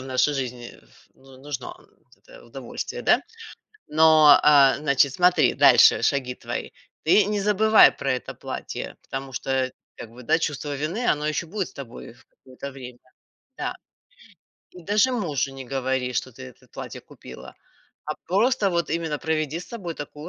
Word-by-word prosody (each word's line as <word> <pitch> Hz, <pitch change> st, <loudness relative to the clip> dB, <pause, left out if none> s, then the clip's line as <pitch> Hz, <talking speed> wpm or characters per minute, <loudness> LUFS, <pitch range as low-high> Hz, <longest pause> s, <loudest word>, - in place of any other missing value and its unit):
в -, -, -9 dB
нашей 130 Hz, +3 st, +1 dB
жизни 125 Hz, -3 st, -6 dB, 0.4 s
ну 135 Hz, 0 st, -18 dB
нужно 145 Hz, -, -6 dB
вот 365 Hz, -, -26 dB
это -, -, -16 dB
удовольствие, -, -, -7 dB
да, -, -, +4 dB, 0.7 s
но, 155 Hz, -1 st, +6 dB
э, 140 Hz, -2 st, +6 dB
значит 140 Hz, -2 st, +2 dB
смотри 180 Hz, +2 st, +3 dB
дальше -, -, +6 dB
шаги 130 Hz, -3 st, 0 dB
твои. -, -, -6 dB, 0.4 s
Ты 205 Hz, +5 st, +5 dB
не 210 Hz, -1 st, -1 dB
забывай 210 Hz, +2 st, +5 dB
про 135 Hz, -, -1 dB
это 125 Hz, -, -5 dB
платье, -, -, -7 dB
потому 135 Hz, 0 st, -7 dB
что 135 Hz, -, -5 dB
это, 130 Hz, -1 st, 0 dB, 0.2 s
как 115 Hz, -, -10 dB
бы, 125 Hz, +2 st, -13 dB
да, 120 Hz, -, +2 dB
чувство 150 Hz, -2 st, -3 dB
вины, 170 Hz, -, -3 dB
оно 150 Hz, 0 st, -3 dB
еще 155 Hz, +2 st, -2 dB
будет 195 Hz, +2 st, -4 dB
с -, -, -18 dB
тобой 125 Hz, -3 st, -10 dB
в 120 Hz, +2 st, -23 dB
какое-то 130 Hz, +2 st, -11 dB
время, 125 Hz, -2 st, -11 dB, 0.6 s
да. -, -, -3 dB, 1.0 s
И 180 Hz, -, -13 dB
даже 210 Hz, +7 st, +2 dB
мужу 150 Hz, -, -2 dB
не 135 Hz, -, -8 dB
говори, 130 Hz, -1 st, -1 dB
что 130 Hz, -, -3 dB
ты 130 Hz, -, -13 dB
это 130 Hz, -2 st, -15 dB
платье -, -, -8 dB
купила, -, -, -13 dB, 0.5 s
а 155 Hz, -, -3 dB
просто 205 Hz, +2 st, +2 dB
вот 170 Hz, -2 st, -1 dB
именно 160 Hz, -3 st, -2 dB
проведи 155 Hz, -1 st, -2 dB
с -, -, -12 dB
собой 190 Hz, -8 st, -6 dB
такую 150 Hz, +2 st, -9 dB
150 Hz, 170 wpm, -24 LUFS, 130-175 Hz, 1.0 s, но